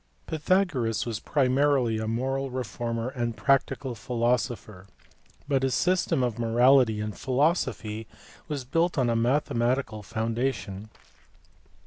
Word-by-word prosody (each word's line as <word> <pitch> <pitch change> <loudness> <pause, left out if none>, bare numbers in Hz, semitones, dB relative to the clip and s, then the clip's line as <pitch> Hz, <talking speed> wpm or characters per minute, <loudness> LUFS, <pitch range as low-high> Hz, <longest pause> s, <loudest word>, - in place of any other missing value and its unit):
Pythagoras 155 - 0
was 115 -3 -3
primarily 130 -4 +2
a 110 - -3
moral 135 +4 -1
reformer 120 -1 -3
and 120 -4 -3
practical 135 -1 +1
philosopher, 120 -4 -2 0.6
but 140 -2 +1
his 135 -1 +1
system 180 -7 +1
of 120 -2 -2
morality 120 0 +4
and 105 -1 -4
philosophy 125 - 0 0.4
was 145 -4 -4
built 165 +6 +1
on 125 -3 +2
a - - +1
mathematical 120 -2 0
foundation. 110 -1 -3
125 Hz, 110 wpm, -27 LUFS, 115-135 Hz, 0.6 s, morality